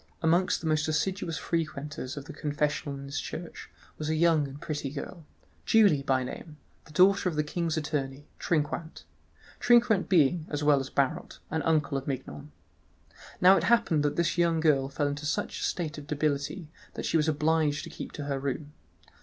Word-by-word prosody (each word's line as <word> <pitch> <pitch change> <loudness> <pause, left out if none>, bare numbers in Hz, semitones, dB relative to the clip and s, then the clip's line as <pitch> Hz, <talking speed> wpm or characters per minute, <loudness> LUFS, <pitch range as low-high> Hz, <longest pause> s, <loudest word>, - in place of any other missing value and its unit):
Amongst 170 +3 +2
the - - -7
most 155 0 +1
assiduous 165 +2 -1
frequenters 150 -5 -3
of 140 - -6
the 160 - -9
confessional 145 -1 -2
in 135 - -8
his 140 +1 -3
church 170 +1 -7 0.3
was 155 0 -3
a 160 - +1
young 160 -2 +3
and 135 +1 -10
pretty 150 -3 -4
girl, 155 +3 -8 0.4
Julie 205 -10 +4
by 130 -1 +1
name, 150 +4 -8 0.3
the - - -16
daughter 185 +3 +4
of 165 - -5
the 150 - +1
king's 165 +1 -2
attorney, 145 -2 -3
Trinquant—Trinquant 190 +8 0
being, 165 -2 +3
as 145 0 -3
well 145 -1 +5
as 135 0 -5
Barot, 135 -2 -1
an 160 - 0
uncle 150 -3 +1
of 135 - -13
Mignon. 140 +2 -5 0.9
Now 185 +2 +7
it - - 0
happened 230 -10 +3
that 145 0 0
this 170 +1 0
young 170 -1 +3
girl 140 -4 +2
fell 145 +1 -1
into 145 +1 -3
such - - -2
a - - -4
state 155 -4 -2
of 145 - -12
debility 150 +3 -2 0.2
that - - -4
she - - -1
was 160 -1 +3
obliged 155 -1 +1
to - - -8
keep - - -8
her 140 -2 -3
room. 140 +2 -4
150 Hz, 180 wpm, -28 LUFS, 145-165 Hz, 0.9 s, Now